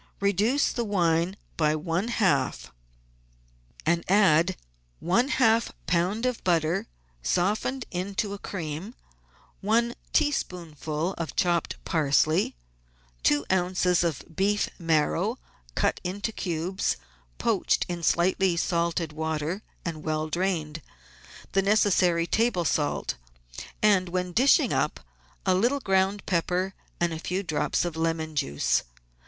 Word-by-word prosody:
Reduce 205 Hz, +8 st, +2 dB
the 240 Hz, -, -2 dB
wine 175 Hz, -3 st, +1 dB, 0.2 s
by 155 Hz, -1 st, +2 dB
one 165 Hz, +6 st, -1 dB
half, 145 Hz, -, 0 dB, 1.1 s
and 170 Hz, +1 st, +2 dB
add 185 Hz, -3 st, +4 dB, 0.4 s
one 210 Hz, +10 st, +2 dB
half 230 Hz, -5 st, +3 dB, 0.2 s
lb. 185 Hz, +7 st, +1 dB
of 250 Hz, -2 st, -1 dB
butter 165 Hz, -2 st, +1 dB, 0.3 s
softened 210 Hz, -, 0 dB
into 200 Hz, +3 st, -2 dB
a 200 Hz, -, -7 dB
cream; 175 Hz, -, -5 dB, 0.6 s
one 230 Hz, +4 st, +2 dB, 0.2 s
teaspoonful 170 Hz, -, -1 dB
of 165 Hz, -, -4 dB
chopped 175 Hz, -2 st, +1 dB
parsley, 155 Hz, -, +2 dB, 0.7 s
two 145 Hz, -, +2 dB
oz. 180 Hz, -1 st, +2 dB
of 165 Hz, -6 st, -1 dB
beef 205 Hz, +3 st, +1 dB
marrow 165 Hz, +7 st, +1 dB, 0.4 s
cut -, -, +1 dB
into 200 Hz, +5 st, -3 dB
cubes, 180 Hz, -1 st, -2 dB, 0.4 s
poached -, -, +1 dB
in 175 Hz, -1 st, -4 dB
slightly 175 Hz, +1 st, +2 dB
salted 170 Hz, -2 st, 0 dB
water 160 Hz, +4 st, -2 dB, 0.2 s
and 160 Hz, -3 st, -4 dB
well 155 Hz, 0 st, -1 dB
drained, 160 Hz, -3 st, -1 dB, 0.7 s
the 195 Hz, -, +3 dB
necessary 190 Hz, -4 st, +3 dB
table 220 Hz, -3 st, +1 dB
salt, 150 Hz, -2 st, 0 dB, 0.7 s
and, 195 Hz, -4 st, +4 dB
when 180 Hz, 0 st, -2 dB
dishing 255 Hz, +9 st, +4 dB
up, -, -, 0 dB, 0.5 s
a 190 Hz, -, +4 dB
little 240 Hz, +10 st, +2 dB
ground 195 Hz, -2 st, +1 dB
pepper 180 Hz, +2 st, 0 dB, 0.3 s
and 175 Hz, -1 st, +1 dB
a 160 Hz, -, -5 dB
few 185 Hz, +4 st, -2 dB
drops 160 Hz, 0 st, 0 dB
of 170 Hz, -2 st, -3 dB
lemon 160 Hz, -1 st, -1 dB
juice. 70 Hz, -, +1 dB
180 Hz, 115 wpm, -27 LUFS, 160-200 Hz, 1.1 s, add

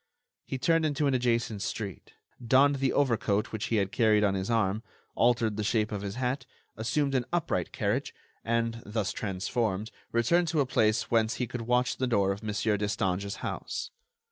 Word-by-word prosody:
He 135 Hz, -, -3 dB
turned 165 Hz, +4 st, +2 dB
into 150 Hz, -1 st, +1 dB
an 140 Hz, -, +2 dB
adjacent 120 Hz, -4 st, 0 dB
street, 100 Hz, -3 st, -5 dB, 0.3 s
donned 135 Hz, +4 st, +4 dB
the 135 Hz, -1 st, +1 dB
overcoat 115 Hz, -6 st, +1 dB
which 110 Hz, -1 st, -3 dB
he 115 Hz, -, 0 dB
had 100 Hz, -2 st, +1 dB
carried 110 Hz, -2 st, +3 dB
on 100 Hz, -2 st, +3 dB
his 95 Hz, +1 st, -2 dB
arm, 110 Hz, -2 st, +1 dB, 0.3 s
altered 115 Hz, -3 st, +2 dB
the 105 Hz, -, -1 dB
shape 105 Hz, 0 st, +1 dB
of 105 Hz, -2 st, -3 dB
his 100 Hz, 0 st, -4 dB
hat, 125 Hz, +1 st, -2 dB, 0.3 s
assumed 135 Hz, +5 st, 0 dB
an 125 Hz, -2 st, +1 dB
upright 150 Hz, -, -1 dB
carriage, -, -, -1 dB, 0.3 s
and, 115 Hz, 0 st, 0 dB
thus 105 Hz, -1 st, -2 dB
transformed, 105 Hz, +1 st, -2 dB, 0.2 s
returned 165 Hz, +10 st, +3 dB
to 160 Hz, -1 st, 0 dB
a 140 Hz, -, +3 dB
place 110 Hz, -4 st, +1 dB
whence 115 Hz, 0 st, +2 dB
he 125 Hz, -, -1 dB
could 120 Hz, +1 st, -5 dB
watch 125 Hz, +2 st, +1 dB
the 130 Hz, -, 0 dB
door 100 Hz, -5 st, +2 dB
of 100 Hz, +1 st, -4 dB
Mon. 110 Hz, -1 st, -3 dB, 0.3 s
Destange's 100 Hz, -1 st, -1 dB
house. -, -, -4 dB
115 Hz, 180 wpm, -29 LUFS, 105-125 Hz, 0.3 s, donned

